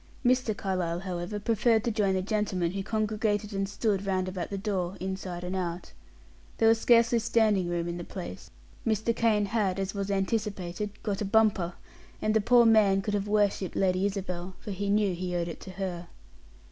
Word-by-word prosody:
Mr. 245 -4 +2
Carlyle, 180 -3 -2
however, 185 +2 -4
preferred 225 +1 +2
to 235 - 0
join 205 -3 +1
the 185 - 0
gentlemen 195 -4 0
who 195 +1 -3
congregated 215 0 -1
and 195 0 -1
stood 205 -2 0
round 190 -2 0
about 185 -2 -4
the 200 - -3
door 190 -2 -2
inside 185 -2 -4
and 180 +1 -3
out. 175 -1 -4 0.7
There 225 - +4
was 225 0 +4
scarcely 235 0 +5
standing 215 -5 +2
room 170 -1 -1
in 170 0 -3
the 175 - -5
place; 90 - -8 0.3
Mr. 220 +1 0
Kane 215 -3 +2
had, 200 -3 0
as 195 0 -2
was 200 -1 -3
anticipated, 200 -1 -2
got 205 -1 -2
a - - 0
bumper, 200 -4 +2 0.5
and 215 - +1
the 220 - +3
poor 235 +2 +5
man 205 -4 +5
could 210 - -2
have 205 0 -1
worshipped 205 -3 +1
Lady 185 0 +2
Isabel, 185 -2 -5
for 210 - -7
he 200 +1 -3
knew 205 -2 +2
he 180 0 -3
owed 170 -1 -1
it 170 - -6
to 190 - -9
her. 180 -2 -4
195 Hz, 190 wpm, -28 LUFS, 185-215 Hz, 0.7 s, scarcely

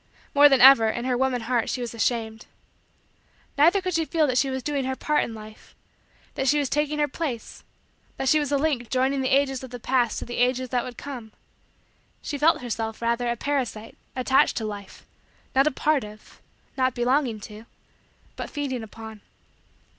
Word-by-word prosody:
More 290 0 +7
than 270 -2 +4
ever, 250 -4 +8
in 240 +2 -3
her 255 -1 +1
woman 255 -1 0
heart, 235 0 0
she - - -2
was 240 -1 -4
ashamed. 225 -1 -2 1.1
Neither 340 +7 +4
could 370 0 -2
she 325 0 +1
feel 320 0 +1
that 255 -3 +1
she 275 - +1
was 260 -1 -4
doing 285 -2 -1
her 265 0 -2
part 300 +3 +1
in 225 - -6
Life 215 0 -13 0.6
that 270 - -2
she 295 - +4
was 285 -3 0
taking 295 +1 0
her 295 0 +2
place 265 -5 -5 0.5
that 270 - -2
she 310 - +5
was 290 -2 -2
a 285 - +3
link 275 -6 -1
joining 265 +1 +1
the 260 - 0
ages 270 -1 +1
of 260 - -8
the 245 0 -8
past 245 -1 +1
to - - -5
the 240 - -6
ages 250 +1 +1
that 245 -1 0
would 245 -2 -8
come. 245 -6 -8 0.9
She 285 - -4
felt 310 -2 +3
herself, 225 -2 -4
rather, 235 +1 0
a 235 - 0
parasite, 245 -4 -3 0.2
attached 260 +1 +2
to 220 - -2
Life 205 -2 -8 0.5
not 270 +2 +4
a - - +3
part 295 0 +1
of 210 0 -13 0.3
not 255 -1 +1
belonging 245 -2 +1
to 215 +2 -11 0.7
but - - -6
feeding 275 -4 -3
upon. 220 -1 -10
255 Hz, 190 wpm, -25 LUFS, 235-285 Hz, 1.1 s, ever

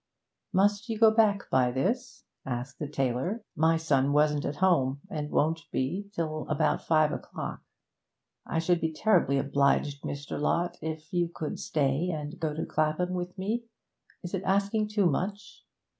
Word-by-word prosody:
'Must 205 +4 +2
you 225 - -1
go 220 0 +7
back 215 -2 +3
by 130 -1 +4
this?' 225 - -2 0.2
asked 125 +1 -5
the 150 - -3
tailor. 140 - -1
'My 160 +1 +3
son 145 -4 +2
wasn't 150 -1 +3
at 145 - -2
home, 145 -7 +2
and 150 -2 -3
won't 160 +3 +1
be 180 +10 -2
till 155 -2 -2
about 150 0 +1
five 155 -2 +3
o'clock. - - -5 0.8
I - - -3
should 170 +1 +2
be 160 - 0
terribly 165 -5 +3
obliged, 140 +1 +1
Mr. 140 0 -5
Lott, 175 +4 0
if 155 0 -6
you 175 -1 +1
could 155 -3 -5
stay 145 +3 0
and 155 0 -5
go 160 -3 -1
to 160 - -2
Clapham 155 +4 0
with 180 0 -4
me. 220 +5 -2 0.6
Is 175 - -6
it 190 - -1
asking 200 +3 +1
too 210 -2 +1
much?' 190 +6 -2
160 Hz, 160 wpm, -29 LUFS, 145-190 Hz, 0.8 s, go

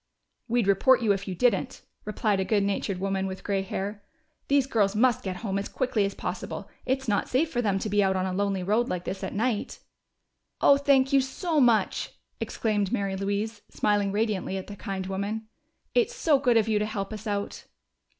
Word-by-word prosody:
"We'd 240 -2 +1
report 235 +6 +4
you 215 - +3
if 200 +1 -5
you 185 - -3
didn't," 245 +6 +1 0.2
replied 210 -1 0
a - - +2
good 205 +1 +1
natured 195 -1 -1
woman 195 0 -1
with 190 0 -7
gray 200 -1 0
hair. 200 +2 -4 0.5
"These 280 -2 +3
girls 210 -6 +1
must 240 +1 +3
get 190 -2 -3
home 195 -1 0
as 200 - -5
quickly 225 -5 0
as 195 - -3
possible. - - -5 0.2
It's 265 0 0
not 205 -2 0
safe 310 +6 +1
for 245 - 0
them 200 -4 +1
to 195 - -3
be 205 0 +2
out 190 0 +2
on 185 0 0
a 185 - -2
lonely 195 -1 0
road 215 +6 +1
like 180 -1 -2
this 190 - -4
at - - -3
night." 225 0 -1 0.8
"Oh, 280 - +6
thank 275 -1 +3
you 275 - +6
so 305 +5 -1
much!" 235 -4 +2 0.3
exclaimed 210 -3 -1
Mary 195 -1 -1
Louise, 205 +2 -2
smiling 205 -1 +1
radiantly 205 -2 -1
at 190 - -5
the 205 - -8
kind 195 -3 -4
woman. 200 +3 -3 0.5
"It's 485 0 +2
so 310 - +3
good 245 -4 +3
of 220 -1 +3
you 215 -1 +2
to 210 - 0
help 210 -1 -4
us 215 +1 -7
out." 205 -1 -3
205 Hz, 205 wpm, -27 LUFS, 195-240 Hz, 0.8 s, Oh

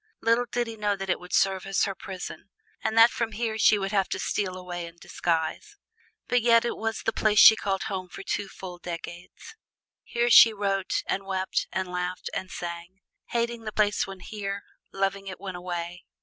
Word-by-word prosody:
Little 230 +2 +2
did 240 0 0
he 225 -1 -8
know 205 -1 0
that 195 -1 -3
it - - 0
would 180 0 -12
serve 195 -1 +2
as 195 - +1
her 195 - 0
prison, 190 -1 -8 0.3
and 220 +1 -1
that 230 +1 +8
from 230 -2 -2
here 220 0 -2
she 215 - +6
would 195 -1 -2
have 195 -3 +1
to - - -2
steal 185 -3 -2
away 175 -2 -6
in 170 - -13
disguise. 170 - -2 0.5
But 245 0 +2
yet 230 0 +5
it 235 - -1
was 225 0 -3
the 225 - 0
place 210 -1 +1
she 220 - +10
called 195 -3 -2
home 190 -4 -4
for - - -9
full 190 -3 -5
two 175 - -9
decades. 175 +1 -8 0.5
Here 240 0 0
she 225 -1 +9
wrote 195 -2 -1
and 195 - -2
wept 190 -1 -1
and 190 0 -2
laughed 180 0 -4
and 190 - -4
sang: 175 +3 -7 0.3
hating 235 -1 -2
the 215 - -3
place 205 -2 +1
when 195 -1 -9
here, 200 -2 -5 0.3
loving 195 0 -1
it 190 - -7
when 190 -2 -6
away. 175 0 -5
195 Hz, 200 wpm, -27 LUFS, 180-220 Hz, 0.5 s, she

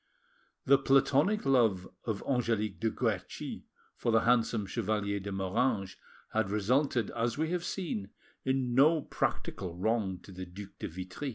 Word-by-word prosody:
The 135 0 +6
platonic 140 +9 +3
love 115 -9 +3 0.2
of 110 -3 -2
Angelique 115 -6 0
de 115 - +1
Guerchi - - -3 0.3
for 120 - 0
the 115 0 +4
handsome 115 -3 +2
Chevalier 100 -1 -1
de 100 +1 -6
Moranges 95 +1 0 0.4
had 110 -3 +1
resulted, 120 +3 +1
as 115 +1 -1
we 160 +2 0
have 180 -1 -1
seen, 160 - -3 0.3
in 130 -2 0
no 150 +4 +5
practical 90 -3 -2
wrong 100 0 0
to 100 - -13
the 95 0 -7
Duc 95 +3 -9
de - - -3
Vitry. 95 - -5
115 Hz, 150 wpm, -31 LUFS, 100-135 Hz, 0.4 s, The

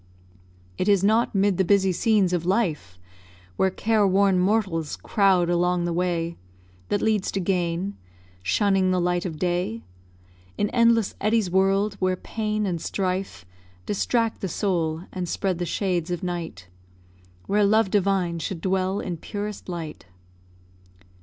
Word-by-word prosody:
It 195 - +1
is 200 -2 +4
not 220 +2 +2
'mid 195 -1 +2
the 190 - +3
busy 190 0 +3
scenes 195 -1 +2
of 175 -2 0
life, 170 - -1 0.6
Where 190 - +2
careworn 200 -2 +2
mortals 185 -5 0
crowd 190 -4 +2
along 175 0 +1
the 175 - -1
way 170 -1 -1 0.5
That 205 - 0
leads 215 -3 +1
to 195 - 0
gain 180 +1 -1 0.4
shunning 195 - +2
the 185 0 +2
light 175 0 0
of 160 -3 -6
day; 180 +6 -1 0.7
In 205 - 0
endless 230 -3 +3
eddies 215 -3 +1
whirl'd, 195 +2 +2
where 185 -1 +1
pain 215 +2 -3
and 175 -4 -2
strife 185 - -3 0.4
Distract 225 +2 0
the 195 - -1
soul, 165 -3 -1
and 180 -2 -4
spread 185 -2 -1
the 175 - -2
shades 180 -3 -1
of 175 -1 -3
night, 170 - -5 0.8
Where 205 +1 +2
love 210 0 +3
divine 190 -4 +1
should 175 +1 -4
dwell 190 +2 0
in 175 -3 -4
purest 205 +3 -6
light. 165 - -6
190 Hz, 140 wpm, -24 LUFS, 175-205 Hz, 0.8 s, is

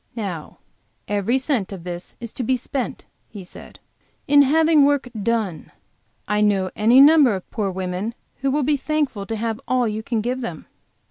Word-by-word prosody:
"Now 190 -9 -5 0.5
every 205 +5 +1
cent 260 -8 -1
of 190 -4 -8
this 175 0 -7
is 235 -2 -8
to - - -5
be 255 +2 +1
spent," 255 +1 -4 0.2
he 205 -3 -9
said, 180 - -13 0.5
"in 285 0 +6
having 310 +2 +4
work 285 -2 +2
done. 215 -6 -2 0.6
I 210 0 +1
know 195 -3 +2
any 230 +5 +5
number 285 -5 +7
of 185 - -7
poor 210 -3 -1
women 190 +4 -4 0.2
who 275 - -1
will 290 +2 +1
be 290 +2 +2
thankful 275 -9 -2
to 225 - -3
have 225 0 -3
all 255 -2 +2
you 215 0 -3
can 225 0 -2
give 250 +3 -2
them." 170 -10 -6
230 Hz, 180 wpm, -22 LUFS, 200-270 Hz, 0.6 s, number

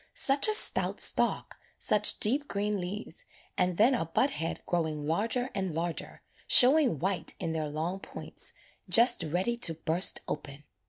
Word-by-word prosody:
Such 280 - +3
a 430 - +4
stout - - +3
stalk, - - +2 0.2
such 210 0 +3
deep 275 +7 +3
green 205 -2 -3
leaves 205 - -7 0.3
and 180 -1 -1
then 235 +6 +3
a 235 - -2
bud 255 - -1
head 165 -11 -4
growing 160 -4 -4
larger 230 - -3
and 190 -5 -5
larger, 170 0 -6 0.2
showing 265 - +5
white 180 +1 -4
in 160 - -4
their 155 -1 -4
long 165 +6 -5
points, - - -8 0.4
just 235 -2 +4
ready 180 +9 -3
to 170 -9 -2
burst 165 +3 +1
open. 145 -1 -8
190 Hz, 155 wpm, -27 LUFS, 165-240 Hz, 0.4 s, showing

